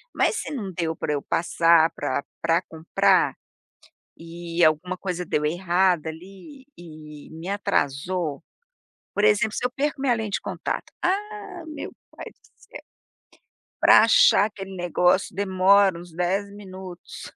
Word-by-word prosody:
mas - - +2
se - - -5
não 210 -9 -5
deu 165 -1 -2
para 150 - -2
eu 145 - -2
passar 165 0 +3
pra 130 - -2 0.2
pra 165 +1 +2
comprar, 160 -1 +1 0.8
e 170 +1 -4
alguma 160 +4 +1
coisa 180 -2 -4
deu 150 -2 -1
errada 175 0 +1
ali 195 - -12
e 155 -3 -12
me 170 +3 -8
atrasou, 160 -4 -1 0.7
por 205 - 0
exemplo, 215 0 +2
se - - -2
eu 250 - 0
perco 280 +1 -2
minha 265 -3 +2
lente 220 -3 -3
de - - -13
contato, - - -4
ah 400 -1 -3
meu 305 - -7 0.2
pai - - -9
do - - -32 0.2
céu, - - -13 1.0
para - - +7
achar 485 - +5
aquele 195 -2 -8
negócio 180 +1 +1
demora 190 -1 +3
uns 175 -1 -13
10 185 +4 -1
minutos, 185 -3 -10
185 Hz, 140 wpm, -24 LUFS, 165-205 Hz, 1.0 s, para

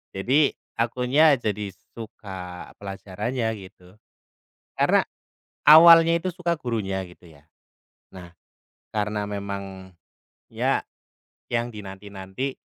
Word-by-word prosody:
Jadi, 135 +9 +2 0.2
akunya 125 +6 +3
jadi 105 -3 -3 0.2
suka 95 -5 -9
pelajarannya, 105 +4 -4
gitu. 95 -1 -15 0.8
Karena, - - +4 0.7
awalnya 165 +2 +9
itu 170 +2 -3
suka 170 -1 -2
gurunya, 100 -8 -3
gitu 90 0 -17
ya. 75 -1 -20 0.7
Nah, 90 -2 -11 0.6
karena 105 0 -1
memang 100 -2 -6 0.6
ya, - - +1 0.7
yang 120 0 0
dinanti-nanti, 100 +3 -7
105 Hz, 90 wpm, -24 LUFS, 95-125 Hz, 0.8 s, awalnya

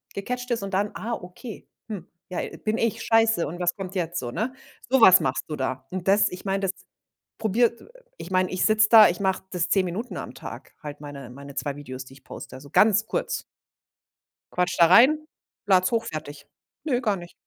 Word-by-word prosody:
gecatcht 250 +5 -4
ist 230 -4 0
und 195 -1 -6
dann, 205 +2 +1
„Ah, 235 +2 -4
okay, 180 +4 -8 0.2
hm, 205 -4 -6 0.2
ja, 180 - -3 0.3
bin 215 +1 +1
ich 230 -3 0
scheiße 225 -6 +3
und 175 +4 -7
was 175 0 0
kommt 190 -1 -6
jetzt?“ 170 -2 -2
So, 120 -1 -5
ne? 240 - -2 0.4
So 265 0 +4
was 185 -4 +9
machst 130 0 -1
du 155 - -4
da. 130 -1 -3
Und 185 0 -5
das 205 +1 +4
ich 180 - -9
meine, 195 0 0
das 195 -2 0 0.7
probiert 230 +2 +1 0.3
ich - - -9
meine, 185 -1 +2
ich 185 - 0
sitze 215 0 +4
da, 220 -2 +9
ich 175 - -2
mache 190 -1 0
das 180 -3 -1
10 195 -2 +3
Minuten 195 +8 -4
am - - -6
Tag, - - -10
halt 145 -1 -8
meine 140 -4 -8
meine 140 +2 -11
2 145 -1 -3
Videos, 130 -2 -8
die 135 - -14
ich 135 - -19
poste, 130 - -9
so 140 0 -14
ganz 215 0 +4
kurz. - - -2 1.1
Quatsche 180 0 0
da 170 - +8
rein, 270 - +6 0.4
lade 185 -2 +4
es 185 - +1
hoch, 230 -1 +1
fertig. 150 -2 -7 0.4
Nö, 255 -5 +1
gar 210 -5 0
nicht. 175 -1 -10
185 Hz, 210 wpm, -25 LUFS, 160-220 Hz, 1.1 s, was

